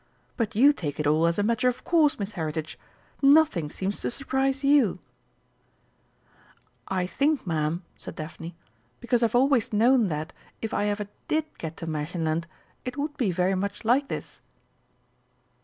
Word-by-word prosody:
But 230 -6 -2
you 280 +7 +6
take 150 - -5
it 150 - 0
all 155 +3 +3
as 170 - 0
a 205 - +2
matter 230 +3 +2
of 250 - -5
course, 315 -4 +3
Miss 200 0 -4
Heritage; 160 -3 -4 0.4
nothing 275 - +5
seems 195 +5 -3
to - - -2
surprise 270 +1 -1
you." 275 -6 +4 1.9
"I 185 -1 0
think, 285 +9 0
Ma'am," 160 +1 -1
said - - -9
Daphne, 165 +2 -7 0.4
"because 240 0 +1
I've 230 0 +2
always 260 -2 +3
known 230 +2 +4
that, 155 -2 -4 0.3
if 225 - -4
I 205 - +1
ever 205 0 -1 0.2
did 310 0 +1
get 160 -1 -6
to - - -6
Märchenland, 160 +1 -2 0.4
it 250 +2 -5
would 295 +1 -2
be 250 -9 0
very 180 +2 +1
much 200 +3 -3
like 265 +5 +3
this." - - -6
205 Hz, 155 wpm, -26 LUFS, 165-270 Hz, 1.9 s, you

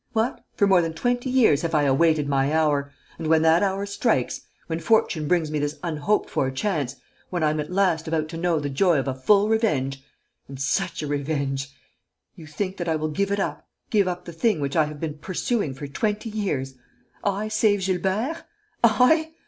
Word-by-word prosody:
What! 225 +2 -1
For 200 - +3
more 190 -3 +5
than 165 -1 -2
twenty 245 +6 -1
years 250 - +4
have 165 -1 -1
I 150 - +3
awaited 150 +2 +3
my 140 0 +1
hour; 145 -3 +1 0.3
and, 160 - -3
when 160 0 +4
that 160 +1 +5
hour 195 0 0
strikes, 200 - 0 0.2
when 160 0 -3
fortune 165 -4 +1
brings 165 -2 +1
me 155 - -1
this 145 +1 -2
unhoped 165 +4 0
for 130 - 0
chance, 140 -2 -2 0.3
when 175 -3 -2
I 155 - +3
am 155 - -2
at 150 - -4
last 180 -4 +1
about 160 -1 0
to 165 - -6
know 170 -1 +1
the 145 - -3
joy 165 +4 +2
of 135 - -1
a 135 - 0
full 200 +11 +3
revenge 140 - 0 0.4
and 135 -1 -9
such 135 +3 -1
a - - -3
revenge! 140 -1 -2 0.7
you 160 - -12
think 185 +6 -4
that 175 -1 -3
I 160 - +2
will 155 0 -2
give 200 +6 -1
it 200 - 0
up, - - -3 0.2
give 205 -4 +3
up 180 0 -4
the 170 - -8
thing 190 +2 +1
which 140 -1 -2
I 160 -2 +4
have 150 -1 -8
been 155 -1 -5
pursuing 185 - -2
for 145 - -7
twenty 210 - -2
years? 145 -11 -2 0.5
I 200 +1 -1
save 210 -2 +2
Gilbert? 195 - -1 0.4
I? 315 +8 +4
165 Hz, 205 wpm, -24 LUFS, 145-200 Hz, 0.7 s, more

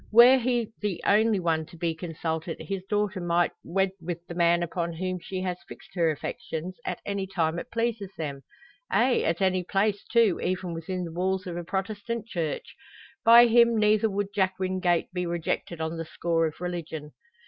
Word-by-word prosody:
Were 240 +4 +8
he 240 -2 0
the 205 -4 -1
only 215 0 +4
one 160 -3 0
to 170 - -14
be 165 0 0
consulted 165 0 -4
his 195 -2 -4
daughter 210 -2 0
might 175 0 +2
wed 190 +1 +1
with 170 0 -5
the 175 - -7
man 170 0 +3
upon 170 0 -2
whom 185 +2 -3
she 185 +2 -5
has 180 -1 -2
fixed - - -13
her 170 -3 +2
affections, 170 - -5
at - - -3
any 200 -1 -2
time 170 -3 0
it - - -8
pleases 230 -4 -1
them 140 -4 -4 0.5
ay, 250 0 +3
at 165 +2 0
any 185 -1 +2
place, 200 +2 0
too, 230 -6 +3
even 185 -1 -2
within 180 +3 -4
the 170 - -5
walls 185 +2 -1
of 175 -2 -5
a 175 - -4
Protestant 205 +5 -3
Church! 170 -9 -4 0.5
By 235 +1 +9
him 235 0 +5
neither 215 +1 +3
would 200 0 -2
Jack 190 -2 +1
Wingate 185 -2 0
be 180 -1 -2
rejected 170 0 -2
on 160 +1 -3
the 165 - -4
score 165 0 0
of 155 - -8
religion. 165 -4 -5
185 Hz, 185 wpm, -27 LUFS, 170-205 Hz, 0.5 s, By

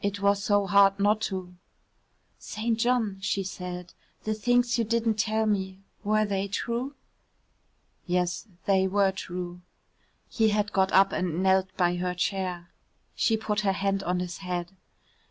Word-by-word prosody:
"It 200 0 -1
was 200 0 +2
so 205 0 +2
hard 200 0 +5
not 210 +2 +3
to." 185 -2 -5 0.9
"St. 225 +1 -2
John," 225 -5 +1
she 195 0 0
said, 180 -1 -6 0.3
"the 215 - -1
things 245 +2 +2
you - - +3
didn't 225 -1 0
tell 220 +1 +1
me, 190 -3 -1 0.3
were 215 +1 +2
they 200 -1 -1
true?" 235 +7 -3 1.1
"Yes, 180 +3 -1 0.2
they 190 -1 +3
were 195 0 +3
true." 180 -2 -6 0.7
He 220 -2 +2
had 210 0 0
got 190 -1 +2
up 195 +1 +5
and 180 -1 -1
knelt 190 0 +3
by 175 -1 +2
her 180 0 -2
chair. 180 -2 -2 0.4
She 225 - +2
put 210 -1 -1
her 200 -2 +1
hand 195 0 0
on 180 -1 -1
his 180 -1 -5
head. 180 -2 -4
195 Hz, 155 wpm, -27 LUFS, 185-215 Hz, 1.1 s, hard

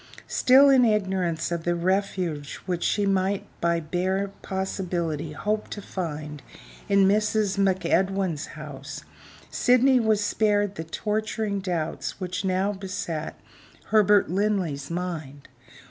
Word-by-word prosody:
Still 265 +3 +5
in 260 -2 +6
ignorance 190 -7 0
of 170 -1 -2
the 175 +1 +1
refuge 180 -4 -1
which 180 -2 -2
she 205 - +1
might 195 0 +1 0.2
by 170 0 +2
bare 185 +5 -1
possibility 175 -5 -3
hope 210 +6 -2
to - - -6
find 150 -7 -5 0.5
in 200 -1 +5
Mrs. 210 0 +1
MacEdwin's 190 -3 +1
house, - - -8 0.5
Sydney 255 +1 +4
was 220 -2 +2
spared 205 -2 +1
the 160 - -5
torturing 210 +3 -2
doubts 175 -3 -3
which 185 +1 -3
now 190 +2 +1
beset 180 -5 -4 0.6
Herbert 210 -1 +5
Linley's 185 -7 -1
mind. 165 -5 -5
190 Hz, 115 wpm, -25 LUFS, 170-205 Hz, 0.6 s, in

